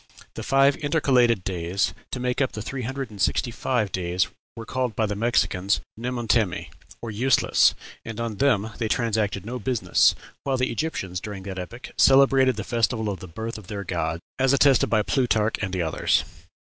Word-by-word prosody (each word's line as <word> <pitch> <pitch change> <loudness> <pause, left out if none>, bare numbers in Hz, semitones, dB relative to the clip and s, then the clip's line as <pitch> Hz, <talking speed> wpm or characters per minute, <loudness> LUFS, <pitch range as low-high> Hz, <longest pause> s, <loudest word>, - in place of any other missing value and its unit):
The - - -6
five 135 +1 +3
intercalated 130 - +2
days 90 -1 -1 0.2
to 125 - -3
make 125 +2 -1
up 130 - 0
the 105 - -5
three 135 +2 -5
hundred 130 0 -4
and 100 -2 -8
sixty 120 - +1
five 115 -4 -1
days 90 0 0 0.3
were 115 - -7
called 125 -1 -2
by 110 - +1
the 105 -1 -2
Mexicans 100 -3 +1 0.2
Nemontemi, 115 -5 -1 0.3
or 115 - -4
useless, 120 +3 +3 0.3
and 115 -1 -7
on 115 -3 -3
them 110 -4 +2
they 115 - 0
transacted 110 -5 0
no 125 +3 -4
business; 125 -4 +2 0.3
while 135 -1 0
the 125 0 0
Egyptians, 95 - -3
during 100 -3 -7
that 95 -1 -6
epoch, 120 - -8
celebrated 135 -1 +5
the - - -4
festival 115 -2 0
of 100 - -4
the 95 - -9
birth 110 +6 -6
of 100 - -15
their 100 -1 -5
gods, 85 -2 -2 0.2
as 135 +1 +3
attested 140 -2 +4
by 110 -2 +2
Plutarch 115 -4 +1
and 95 -3 -2
others. 80 -2 +1
115 Hz, 180 wpm, -24 LUFS, 100-130 Hz, 0.3 s, celebrated